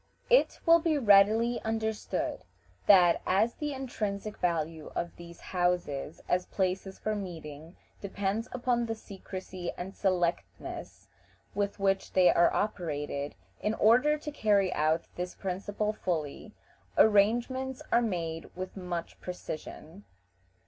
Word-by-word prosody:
It -, -, +4 dB
will 335 Hz, 0 st, +7 dB
be 320 Hz, -2 st, +1 dB
readily 220 Hz, +1 st, +5 dB
understood 220 Hz, -1 st, -2 dB, 0.4 s
that, 180 Hz, -4 st, +6 dB
as 215 Hz, +5 st, +3 dB
the 295 Hz, -1 st, -3 dB
intrinsic 215 Hz, -6 st, -4 dB
value 165 Hz, -3 st, -1 dB
of 170 Hz, 0 st, -3 dB
these 170 Hz, 0 st, -12 dB
houses 175 Hz, -5 st, -1 dB
as 180 Hz, 0 st, +1 dB
places 190 Hz, 0 st, -2 dB
for 215 Hz, 0 st, -2 dB
meeting 165 Hz, -4 st, -7 dB, 0.2 s
depends 200 Hz, +3 st, -2 dB
upon 240 Hz, -1 st, 0 dB
the 225 Hz, -, -2 dB
secrecy 185 Hz, -3 st, -7 dB
and 190 Hz, +2 st, -6 dB
selectness 180 Hz, -3 st, -2 dB, 0.5 s
with 200 Hz, 0 st, -2 dB
which 195 Hz, 0 st, 0 dB
they 185 Hz, -1 st, +6 dB
are 170 Hz, -, +5 dB
operated, 145 Hz, -8 st, -2 dB, 0.2 s
in 215 Hz, +1 st, -1 dB
order 255 Hz, +9 st, +4 dB
to 300 Hz, 0 st, -6 dB
carry 200 Hz, -8 st, +2 dB
out 155 Hz, +2 st, +1 dB
this 180 Hz, 0 st, -4 dB
principle 205 Hz, +3 st, -2 dB
fully, 175 Hz, +2 st, -4 dB, 0.4 s
arrangements 240 Hz, +5 st, +3 dB
are 235 Hz, -, +5 dB
made 165 Hz, -7 st, -3 dB
with 185 Hz, +1 st, -6 dB
much 180 Hz, -3 st, -5 dB
precision. 180 Hz, +1 st, -7 dB
195 Hz, 120 wpm, -30 LUFS, 175-220 Hz, 0.5 s, will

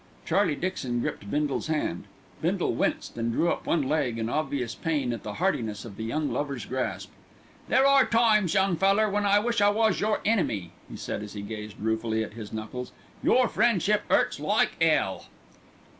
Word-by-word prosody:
Charlie 180 Hz, -2 st, +2 dB
Dixon 135 Hz, -9 st, -2 dB
gripped 100 Hz, -, -4 dB
Bindle's 145 Hz, +2 st, -1 dB
hand. 150 Hz, -, -2 dB, 0.4 s
Bindle -, -, 0 dB
winced -, -, -1 dB
and 115 Hz, 0 st, 0 dB
drew 170 Hz, +9 st, +2 dB
up -, -, -4 dB
one 165 Hz, -4 st, +2 dB
leg 135 Hz, -4 st, 0 dB
in 115 Hz, 0 st, -2 dB
obvious 135 Hz, -4 st, -2 dB
pain 145 Hz, -7 st, -1 dB
at 115 Hz, -, -6 dB
the 105 Hz, -, -6 dB
heartiness 115 Hz, -, -1 dB
of 105 Hz, -4 st, -9 dB
the 110 Hz, -, -6 dB
young 145 Hz, +6 st, -1 dB
lover's 140 Hz, -7 st, -3 dB
grasp. 130 Hz, +1 st, -3 dB, 0.6 s
"There 265 Hz, -, +4 dB
are 275 Hz, -1 st, +5 dB
times, 215 Hz, -5 st, +3 dB
young 190 Hz, -3 st, +2 dB
feller, 195 Hz, +5 st, +3 dB
when 205 Hz, 0 st, +1 dB
I 200 Hz, +1 st, +5 dB
wish 230 Hz, +1 st, +1 dB
I 205 Hz, -, +6 dB
was 220 Hz, +1 st, +2 dB
your 215 Hz, +1 st, +1 dB
enemy," 115 Hz, -, 0 dB, 0.2 s
he -, -, -8 dB
said -, -, -4 dB
as 105 Hz, -1 st, -8 dB
he 100 Hz, -1 st, -6 dB
gazed 105 Hz, 0 st, -7 dB
ruefully 110 Hz, +1 st, 0 dB
at 105 Hz, -, -8 dB
his 110 Hz, -2 st, -8 dB
knuckles. 110 Hz, +3 st, -6 dB, 0.3 s
"Your 255 Hz, -1 st, +4 dB
friendship 210 Hz, -2 st, +2 dB
'urts -, -, +2 dB
like -, -, +2 dB
'ell." -, -, +2 dB
150 Hz, 185 wpm, -27 LUFS, -, 0.6 s, I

